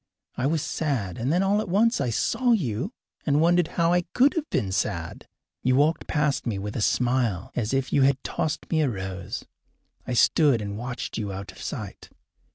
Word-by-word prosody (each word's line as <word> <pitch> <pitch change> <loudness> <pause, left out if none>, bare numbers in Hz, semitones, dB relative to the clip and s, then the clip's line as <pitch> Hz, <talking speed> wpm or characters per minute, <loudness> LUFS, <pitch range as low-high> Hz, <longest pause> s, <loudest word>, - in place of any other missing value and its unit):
I 130 - 0
was 155 0 0
sad, 125 - -2
and 125 +5 0
then 180 +4 +3
all 200 +2 +2
at 210 - -6
once 220 - +3
I 125 - 0
saw 245 - +2
you, 135 - -1 0.3
and 145 -1 +2
wondered 175 +1 +4
how 170 0 +3
I 180 - +3
could 270 +3 +5
have 315 -2 -3
been 100 -7 -1
sad. - - -3 0.3
You 130 0 +2
walked 150 +4 +2
past 150 -4 0
me 110 -4 -1
with 105 +1 -5
a 115 - -1
smile, 120 -5 +1
as 110 -3 -1
if 135 -1 -1
you 140 - +4
had 135 0 +4
tossed 155 - -2
me 160 -2 +3
a 145 - +2
rose. 95 0 -5 0.6
I 125 - -2
stood 135 +1 +4
and 100 -1 -4
watched 120 +1 -5
you 105 -2 -3
out 95 0 -6
of - - -14
sight. - - -6
135 Hz, 200 wpm, -25 LUFS, 110-165 Hz, 0.6 s, could